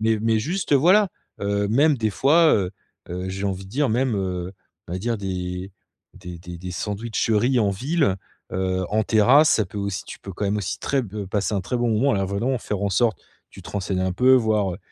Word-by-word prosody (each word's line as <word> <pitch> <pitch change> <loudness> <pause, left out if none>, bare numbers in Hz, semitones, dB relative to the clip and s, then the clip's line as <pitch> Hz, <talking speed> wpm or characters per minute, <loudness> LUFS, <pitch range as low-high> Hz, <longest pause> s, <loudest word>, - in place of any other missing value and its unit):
mais 110 0 +2
mais 115 0 +2
juste, 160 - -2
voilà. 185 +8 +5 0.3
Heu, 100 0 0
même 145 +6 +3
des 110 -1 +1
fois, 155 +9 +4
heu, 95 -3 0 0.4
heu, 90 +1 -4
j'ai 95 +2 -4
envie 95 -1 -2
de - - -14
dire, 140 +3 +1
même, 125 0 +1
heu, 90 -1 -3 0.4
on 85 - -6
va 90 - -2
dire 115 +2 -2
des 90 -1 -4 0.4
des 90 -1 -9
des 85 +1 -9
des 90 +1 -7
sandwicheries 110 +5 0
en 105 - +2
ville, 135 - 0 0.4
heu, 95 0 -1
en 110 +1 +2
terrasse 125 +9 +5
ça 110 -4 +2
peut 95 - -11
aussi 100 -2 -3
tu - - -9
peux 100 - -8
quand 105 - -4
même 100 +2 0
aussi 100 - -3
très 135 -2 0
b 105 -1 -6
passer 100 +2 -1
un 100 - 0
très 125 - -2
bon 120 -1 0
moment. 125 +5 +2
Alors 95 - 0
en - - -2
venant, 125 +5 0
faire 105 -2 -4
en 100 - +1
sorte, 110 -3 +1 0.3
tu - - -12
te - - -11
renseignes 95 -2 -2
un 95 0 0
peu, 125 +7 +4
voir, 110 -5 +2
heu, - - -11
105 Hz, 230 wpm, -23 LUFS, 95-125 Hz, 0.4 s, voilà